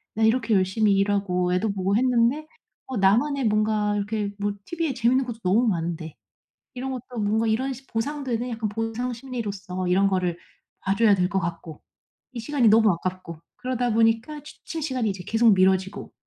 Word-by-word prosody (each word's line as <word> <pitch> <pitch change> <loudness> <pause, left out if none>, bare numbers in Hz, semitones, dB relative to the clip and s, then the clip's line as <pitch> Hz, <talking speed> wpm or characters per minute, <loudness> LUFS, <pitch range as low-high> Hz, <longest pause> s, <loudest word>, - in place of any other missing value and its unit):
'나 220 - 0
이렇게 230 0 +2
열심히 200 +2 +2
일하고 195 -3 +1
애도 200 +3 +1
보고 195 +1 0
했는데 250 +4 +2 0.4
어 260 -4 -4
나만의 240 +8 +2
뭔가 210 -1 +1
이렇게 205 0 -2
뭐 205 0 -1
티브이에 330 -5 -2
재밌는 250 +2 +2
것도 235 -2 -6
너무 210 +7 +3
많은데 165 -4 -2 0.6
이런 260 +1 -4
것도 250 -1 -7
뭔가 220 +2 +1
이런 260 +5 0 0.2
보상 285 +6 -2
되네?' 245 0 -2
약간 225 -2 -2
보상 225 +3 -3
심리로서 205 -7 -5
이런 190 +2 +3
거를 180 -3 -1 0.4
봐 195 - 0
줘야 210 0 +4
될 180 -1 +1
것 195 -1 0
같고 170 -3 -6 0.5
이 250 - -7
시간이 245 -1 +2
너무 220 -2 +5
아깝고 175 -1 -5 0.2
그러다 250 -2 -1
보니까 225 +6 +1
취침 320 +1 -8
시간이 255 -7 -1
이제 190 -2 -6
계속 225 0 +4
미뤄지고 190 +1 +1
220 Hz, 370 characters per minute, -24 LUFS, 195-245 Hz, 0.6 s, 너무